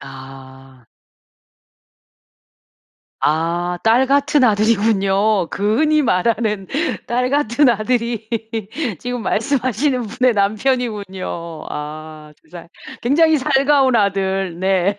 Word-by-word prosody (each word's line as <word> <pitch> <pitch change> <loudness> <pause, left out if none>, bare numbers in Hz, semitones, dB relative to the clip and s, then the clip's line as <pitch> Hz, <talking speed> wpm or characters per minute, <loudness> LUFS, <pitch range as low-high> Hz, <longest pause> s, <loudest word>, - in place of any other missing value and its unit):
아. 135 -1 -13 2.3
아. 170 +3 0
딸 235 +4 +3
같은 280 0 +2
아들이군요. 210 -3 +2
그 210 +3 0
흔히 305 -1 +3
말하는 210 -2 0 0.4
딸 250 +2 -1
같은 285 -1 +2
아들이 230 0 -1 0.7
지금 245 -1 -5
말씀하시는 255 +2 0
분의 250 +2 0
남편이군요. 200 -6 -2
아 155 0 -8
두 - - -28
살 170 -1 -11 0.3
굉장히 315 +6 +3
살가운 270 -1 +2
아들. 195 -3 -1
네. 190 +1 0
210 Hz, 190 characters per minute, -18 LUFS, 180-250 Hz, 2.3 s, 딸